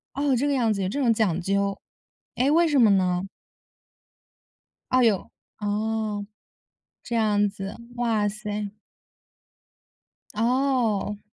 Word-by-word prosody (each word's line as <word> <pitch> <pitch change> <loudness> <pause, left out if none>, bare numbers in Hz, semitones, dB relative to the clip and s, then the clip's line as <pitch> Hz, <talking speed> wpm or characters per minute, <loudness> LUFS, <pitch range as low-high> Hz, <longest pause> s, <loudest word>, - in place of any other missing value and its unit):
哦， 280 -1 +1
这 280 +4 +1
个 285 - +1
样 240 -5 +2
子， 200 - -3
有 185 - -1
这 280 - -3
种 250 -4 +3
讲 195 -6 +1
究。 200 +2 0 0.6
诶， 260 +3 +2
为 335 +2 +4
什 295 -3 +2
么 225 -3 +6
呢？ 180 -2 +2 1.7
哎 255 -1 +4
哟， 210 -5 +1 0.3
哦， 210 0 -2 0.8
这 240 - -5
样 205 -2 +2
子， 195 0 -7 0.2
哇 225 -4 +1
塞。 210 0 -4 1.6
哦。 230 -3 0
215 Hz, 125 characters per minute, -25 LUFS, 205-245 Hz, 1.7 s, 么